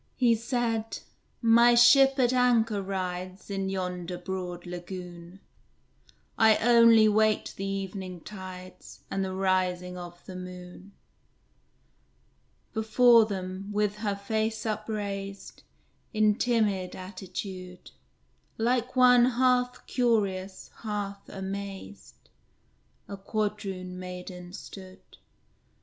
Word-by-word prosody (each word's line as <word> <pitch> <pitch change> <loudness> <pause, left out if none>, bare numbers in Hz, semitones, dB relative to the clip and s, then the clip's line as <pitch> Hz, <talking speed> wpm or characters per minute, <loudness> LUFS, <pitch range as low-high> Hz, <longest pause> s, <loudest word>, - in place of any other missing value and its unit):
He 245 -2 +4
said, 230 -1 -2 0.5
"My 235 +1 +6
ship 270 +3 +6
at 250 -1 +3
anchor 230 -4 +2
rides 185 0 -5
In 195 -1 -2
yonder 180 -2 -4
broad 180 -1 -5
lagoon; 175 0 -8 1.0
I 220 -1 +6
only 230 -2 +6
wait 215 0 +2
the 195 - -4
evening 190 -2 -5
tides, 185 -2 -10
And 195 - -1
the 190 0 -4
rising 180 -1 0
of 175 0 -10
the 185 - -9
moon." 180 +1 -10 1.8
Before 225 +1 +5
them, 190 -1 -5
with 210 0 0
her 210 -2 -2
face 220 +3 -2
upraised, 205 -2 -4 0.5
In 215 -1 +4
timid 205 -6 0
attitude, 185 -1 -8 0.7
Like 245 +2 0
one 250 -1 +6
half 250 0 +1
curious, 200 -6 -1
half 205 -2 -5
amazed, 195 - -8 0.8
A 200 - -7
Quadroon 195 -3 -4
maiden 180 -1 -8
stood. 190 -1 -12
200 Hz, 100 wpm, -28 LUFS, 185-225 Hz, 1.8 s, My